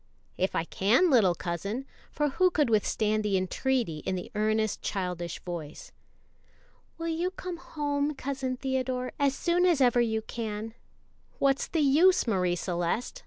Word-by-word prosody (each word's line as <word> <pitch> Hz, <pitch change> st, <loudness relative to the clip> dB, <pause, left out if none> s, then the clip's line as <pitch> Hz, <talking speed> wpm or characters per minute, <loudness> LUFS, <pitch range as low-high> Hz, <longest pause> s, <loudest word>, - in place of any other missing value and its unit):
"If 185 Hz, -, -1 dB
I 165 Hz, -, +1 dB
can, 225 Hz, -, +3 dB
little 200 Hz, -9 st, +5 dB
cousin;" 200 Hz, +11 st, -4 dB, 0.3 s
for 295 Hz, -1 st, 0 dB
who 365 Hz, +7 st, +3 dB
could 300 Hz, -8 st, +1 dB
withstand 215 Hz, 0 st, +1 dB
the 200 Hz, -2 st, +1 dB
entreaty 190 Hz, -, -1 dB
in 185 Hz, -, -2 dB
the 180 Hz, -, -6 dB
earnest 215 Hz, 0 st, 0 dB
childish 180 Hz, -3 st, -3 dB
voice? 165 Hz, -4 st, -7 dB, 1.1 s
"Will 330 Hz, 0 st, -4 dB
you 335 Hz, +2 st, 0 dB
come 365 Hz, -2 st, -6 dB
home, 290 Hz, -2 st, -2 dB
Cousin 265 Hz, -2 st, -3 dB
Theodore, 255 Hz, -1 st, -2 dB
as 280 Hz, -1 st, +2 dB
soon 350 Hz, +1 st, +1 dB
as 350 Hz, -5 st, +4 dB
ever 245 Hz, -2 st, +4 dB
you 220 Hz, -2 st, 0 dB
can?" 220 Hz, -1 st, -5 dB, 0.6 s
"What's 275 Hz, 0 st, +2 dB
the 325 Hz, -, 0 dB
use, 315 Hz, +7 st, +5 dB
Marie 180 Hz, -6 st, +1 dB
Celeste? 175 Hz, -, -2 dB
240 Hz, 150 wpm, -28 LUFS, 195-285 Hz, 1.1 s, little